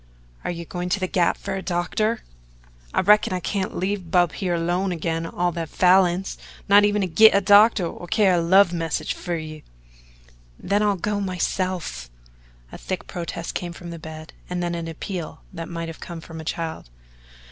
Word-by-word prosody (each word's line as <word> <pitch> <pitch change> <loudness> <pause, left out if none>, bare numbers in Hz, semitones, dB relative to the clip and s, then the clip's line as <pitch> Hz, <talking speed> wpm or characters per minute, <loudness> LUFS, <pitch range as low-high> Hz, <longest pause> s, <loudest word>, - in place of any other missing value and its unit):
"Are - - -3
you 170 -1 -5
going 180 +1 -4
to 200 - +1
the 185 - 0
Gap 180 -2 +1
for - - -5
a 190 - -3
doctor?" 195 +6 -1 0.7
"I - - +2
reckon 210 0 +4
I 185 - -1
can't 190 +1 -3
leave 190 -1 -2
Bub 175 -1 +3
here 180 -3 -2
alone 175 +3 0
agin 165 -1 -2
all 175 +1 -1
the 165 -1 -4
Falins 180 +2 +3 0.3
not 205 +1 +7
even 205 0 +2
to 190 - 0
git 220 +5 +6
a - - +6
doctor 205 0 +6
or 175 +1 -7
to - - -19
carry 195 -4 +4
a 170 - +2
love 185 +2 +5
message 165 -2 -2
fer 175 -1 -4
you." 155 -1 -7 1.0
"Then 200 +2 0
I'll 205 -1 +2
go 205 +3 -2
myself." 185 - -2 0.6
A - - -9
thick 185 -1 -4
protest 170 -1 -5
came 175 -1 -4
from 170 0 -9
the 170 - -7
bed, 155 0 -9 0.2
and 180 0 -2
then 175 0 -1
an 170 -1 -4
appeal 165 0 -6
that 165 -2 -6
might 165 -1 -4
have 165 - -8
come 170 -2 -7
from 160 0 -9
a - - -11
child. 160 - -4
175 Hz, 195 wpm, -23 LUFS, 165-195 Hz, 1.0 s, not